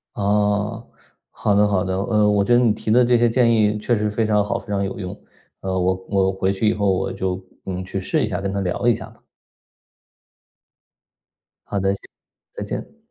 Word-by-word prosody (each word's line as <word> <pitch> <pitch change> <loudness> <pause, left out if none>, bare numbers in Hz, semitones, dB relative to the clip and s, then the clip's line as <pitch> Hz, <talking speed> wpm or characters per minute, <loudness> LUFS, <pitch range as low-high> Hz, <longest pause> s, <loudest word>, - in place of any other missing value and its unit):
哦， 105 +2 0 0.4
好 105 - 0
的 105 +1 +4
好 95 -3 +1
的。 95 -1 -2
呃， 105 +2 +2
我 100 -1 +3
觉 120 - +2
得 120 - +5
你 115 -4 +3
提 110 - -6
的 125 +3 +6
这 120 0 +4
些 120 0 +3
建 120 0 +3
议 105 -2 +3
确 115 +3 0
实 105 0 0
非 110 +2 0
常 105 -1 +2
好、 105 - -1
非 - - -11
常 100 -1 -1
有 95 - -4
用。 90 -2 -6 0.4
呃， 95 -1 -2
我 95 0 +2
我 95 -1 +2
回 95 0 0
去 100 +3 0
以 - - +2
后 100 -1 0
我 95 - -1
就 95 0 -3 0.2
嗯， 95 -1 -4
去 95 +1 -4
试 95 - 0
一 - - 0
下， - - -2
跟 100 0 -2
她 100 - -1
聊 95 +6 -1
一 120 - +5
下 - - -8
吧。 - - -20 2.5
好 100 - -2
的， 95 0 +1
谢 100 - -8 0.5
再 - - -5
见。 - - -6
100 Hz, 230 characters per minute, -21 LUFS, 95-105 Hz, 2.5 s, 的